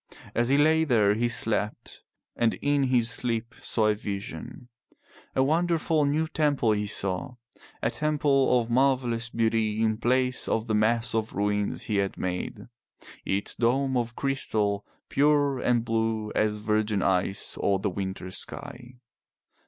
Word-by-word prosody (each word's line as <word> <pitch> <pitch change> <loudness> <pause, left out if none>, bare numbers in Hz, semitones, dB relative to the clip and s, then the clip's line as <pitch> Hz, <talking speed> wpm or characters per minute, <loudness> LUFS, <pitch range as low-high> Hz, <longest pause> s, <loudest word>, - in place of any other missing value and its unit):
As 120 +1 +1
he 140 - +4
lay 160 +2 +4
there 110 -9 +3
he 120 +3 0
slept 105 -2 -2 0.3
and 115 -1 +1
in 145 -1 +1
his 120 -3 +2
sleep 115 0 -1
saw 110 - +1
a - - +3
vision. 105 +4 -7 0.7
A 130 - +3
wonderful 160 0 +1
new 155 +3 +1
temple 145 -8 +1
he 105 -1 0
saw, 100 +7 -2 0.5
a - - +1
temple 145 -4 +2
of 115 0 -4
marvellous 125 -3 +1
beauty 110 -2 0
in 110 -1 +1
place 125 +1 +1
of 110 0 0
the 110 - -2
mass 115 +2 +1
of 110 0 -1
ruins 105 0 -1
he 105 - -1
had 100 -1 -1
made, 90 +3 -4 0.6
its 100 +1 0
dome 130 +3 +1
of 120 -2 -1
crystal 110 -7 -1 0.2
pure 145 -1 +2
and 120 -2 +1
blue 110 -2 -1
as 105 0 +1
virgin 105 -1 0
ice 95 +2 0
or 100 - +1
the 100 +1 -2
winter 95 -1 -5
sky. 125 +6 -6
115 Hz, 145 wpm, -27 LUFS, 105-130 Hz, 0.7 s, he